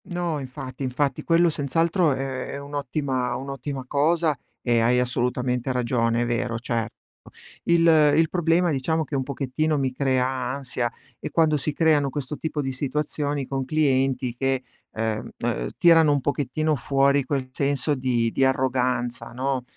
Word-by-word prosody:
No, 175 -4 -2
infatti, 130 0 -8
infatti. 135 +2 -1
Quello 170 0 +4
senz'altro 165 +3 +1
è 130 -1 -4
è - - -4
un'ottima 140 -3 -2
un'ottima 135 0 -5
cosa 155 +3 +2 0.3
e 120 -2 +2
hai 120 +2 +3
assolutamente 125 +1 -1
ragione, 120 -2 +1
è - - +1
vero, 120 0 -1
certo. 115 -1 -3 0.7
Il 170 -1 +3 0.3
il 160 0 +3
problema 175 0 +2
diciamo 160 +4 0
che 150 - -5
un 135 - +1
pochettino 140 +3 -1
mi 135 -2 0
crea 130 -1 +1
ansia 130 -1 -2 0.3
è - - -5
quando 160 -2 +3
si 150 +2 -1
creano 150 -4 +3
questo 145 +1 -4
tipo 155 -2 -3
di 135 - -2
situazioni 145 +1 -2
con 135 0 -2
clienti 130 -3 +1
che, 135 0 0 0.3
ehm, 110 -1 -3
ehm, - - -2
tirano 165 -3 +6
un 140 - 0
pochettino 150 +3 0
fuori 140 +1 +2
quel 130 -1 -2
senso 140 +2 0
di 125 -4 0
di 135 - +1
arroganza, 125 -2 0
no. 130 0 -1
135 Hz, 150 wpm, -24 LUFS, 125-150 Hz, 0.7 s, tirano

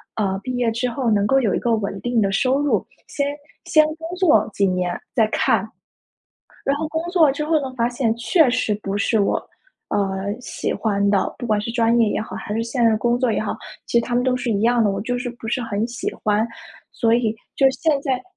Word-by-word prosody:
呃， 195 -3 0
毕 255 - -3
业 240 -2 +1
之 245 +3 -1
后 240 -1 -1
能 205 -1 +2
够 270 +6 +3
有 215 -6 +1
一 - - 0
个 235 -1 +1
稳 200 -2 -3
定 240 -2 +1
的 195 -1 +1
收 260 +7 +2
入， 290 - +1 0.2
先 285 0 -2 0.3
先 310 - +5
工 325 0 -7
作 365 -4 +4
几 200 -1 +2
年 180 -1 -1 0.2
再 225 - +4
看。 220 -2 +1 1.0
然 280 +1 +1
后 315 - -2
工 320 +1 -2
作 320 -7 +4
之 300 - -4
后 325 - +1
呢 260 -1 -5
发 235 -1 +1
现， 240 -2 0
确 270 +5 +3
实 240 -4 0
不 195 +1 -2
是 220 +2 +2
我， 200 - +2 0.5
呃， 195 0 -1
喜 - - -3
欢 200 -2 0
的， 200 -2 +1
不 245 - -4
管 215 -2 +2
是 210 +3 -3
专 235 0 +3
业 230 - +4
也 - - -1
好， 220 - -6
还 210 - -5
是 225 - 0
现 235 +1 -1
任 220 -1 +4
工 240 +2 +1
作 250 -3 +1
也 - - 0
好。 215 - -3 0.3
其 235 - +2
实 235 - 0
他 245 - -3
们 245 - +2
都 255 0 +1
是 250 -1 -2
一 205 -2 0
样 235 0 +3
的， 205 - +3
我 195 - -2
就 245 +4 -2
是 245 0 -3
不 235 -2 -9
是 245 +1 -1
很 220 -1 -2
喜 240 -1 -4
欢。 210 +2 +2 0.5
所 230 -1 +2
以 230 -2 +1 0.2
就 270 -1 +5
现 290 +2 +1
在 265 -3 -1
235 Hz, 255 characters per minute, -21 LUFS, 210-255 Hz, 1.0 s, 先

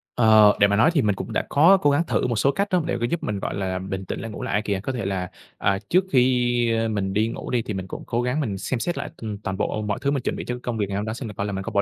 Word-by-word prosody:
Ờ, 110 -3 +6
để 100 - +6
mà 100 - +1
nói 115 +10 +4
thì 145 - +3
mình 105 -4 +1
cũng - - -6
đã - - 0
có 170 +7 +6
cố 145 - +2
gắng 145 +4 +2
thử - - +1
một 120 - -1
số 135 +6 +3
cách 200 +6 -1
đó, 180 -2 +3
để 170 - -1
mà 120 - -1
giúp 170 - -2
mình, 105 -2 -2
gọi - - -3
là, 95 -2 -2
bình 95 0 -5
tĩnh - - -4
lại 115 - -6
ngủ - - -7
lại - - -3
ây 105 - +2
kìa. 100 -2 -2
Có 130 - -2
thể 115 -5 -3
là, 95 -2 -2 0.3
à, 100 0 +1
trước 185 +2 +4
khi 120 -2 +3 0.2
mình 95 -2 -2
đi 110 +2 +2
ngủ 115 - -6
đi 120 - +2
thì 110 - -5
mình 95 -1 -5
cũng - - -7
cố 120 +1 0
gắng 125 +4 -1
mình 105 -10 -2
xem 115 +6 -2
xét 175 +8 -2
lại, - - -4
ừm, 105 -3 -5
toàn 95 -2 -4
bộ 110 - -1
mọi 105 -1 -2
thứ 140 - +1
mình 140 -3 -1
chuẩn - - -1
bị - - -6
cho 125 - -3
cái 125 - -9
công 120 -2 -3
việc 100 -2 -1
ngày 100 - -3
hôm 105 - -2
đó 110 - -3
xem 120 0 -6
thử - - -8
coi 100 - -3
là 105 - -3
mình 95 - -3
có 115 - -5
bỏ 100 -1 +2
110 Hz, 355 wpm, -23 LUFS, 100-125 Hz, 0.3 s, Ờ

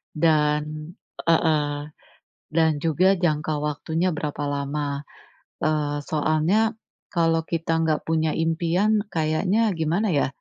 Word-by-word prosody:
Dan 150 0 +1 0.3
heeh. 150 -3 +1 0.6
Dan 160 0 +2
juga 175 +5 +2
jangka 155 -3 0
waktunya 160 +4 -1
berapa 150 -1 -3
lama. 145 0 -2 0.6
Eee, 150 -1 0
soalnya 155 +9 +1 0.4
kalau 165 -1 +2
kita 165 -1 -2
enggak 155 -2 +1
punya 160 -1 +1
impian, 170 +6 +1
kayaknya 180 +8 +1
gimana 170 +7 +1
ya, 140 - +3
155 Hz, 105 wpm, -24 LUFS, 150-165 Hz, 0.6 s, ya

